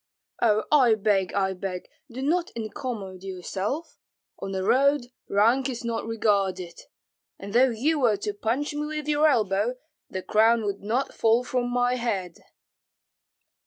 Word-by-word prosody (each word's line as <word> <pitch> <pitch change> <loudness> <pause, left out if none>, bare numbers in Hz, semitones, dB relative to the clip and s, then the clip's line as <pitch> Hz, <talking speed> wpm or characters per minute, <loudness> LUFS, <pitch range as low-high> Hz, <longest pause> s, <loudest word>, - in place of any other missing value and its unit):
"Oh, 215 -2 +3
I 255 -7 +6
beg, 195 -3 +1
I 190 -1 +1
beg, 185 -1 -5 0.2
do 255 +2 -6
not 340 +4 +1
incommode 215 -5 -5
yourself. 195 - -4 0.4
On 195 - -5
the 190 -1 -2
road 265 +2 +2 0.2
rank 235 +7 +3
is 245 -1 -5
not 230 -1 -2
regarded; 195 -5 0 0.6
and 200 +1 -8
though 255 +3 +5
you 285 +7 0
were 230 -6 +3
to 205 +1 -3
punch 245 +9 -2
me 295 0 -3
with 305 -1 -5
your 300 +1 +4
elbow, 215 -3 +1 0.3
the 185 - -5
crown 225 +1 +3
would 200 -1 -3
not 235 +7 -1
fall 230 +2 +3
from 250 -1 -1
my 245 0 +1
head." 195 -8 -3
225 Hz, 150 wpm, -26 LUFS, 200-260 Hz, 0.6 s, I